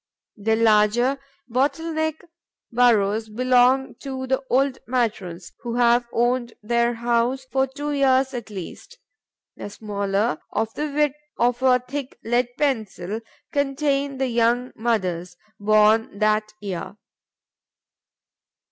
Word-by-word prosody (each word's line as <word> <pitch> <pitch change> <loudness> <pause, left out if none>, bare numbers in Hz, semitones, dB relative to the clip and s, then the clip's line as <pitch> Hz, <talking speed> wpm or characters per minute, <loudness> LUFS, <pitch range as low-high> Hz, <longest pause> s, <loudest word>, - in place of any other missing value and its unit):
The 220 +2 +1
larger, 225 +4 +3 0.3
bottle 290 +7 0
neck 315 0 -2 0.5
burrows 220 -3 +3
belong 255 +3 +3
to 265 -1 -5
the 265 +1 0
old 265 +1 +2
matrons, 205 -8 -2
who 235 -1 -4
have 240 0 +3
owned 240 0 0
their 235 +2 +1
house 240 +3 0
for 265 0 +2
two 290 +3 -5
years 270 -1 +2
at 235 -3 -6
least. 205 - -9 0.6
The - - -6
smaller, 200 -3 -1
of 225 0 -1
the 300 - -2
width 295 0 +1 0.2
of 245 +1 +1
a 255 -1 +5
thick 255 +2 -6
lead 240 +2 +1
pencil, 220 -8 -1 0.3
contain 280 -1 0
the 265 - 0
young 240 +1 +1
mothers, 185 -6 -1 0.2
born 215 +1 +3
that 215 0 +1
year. 200 0 -6
240 Hz, 120 wpm, -23 LUFS, 215-265 Hz, 0.6 s, a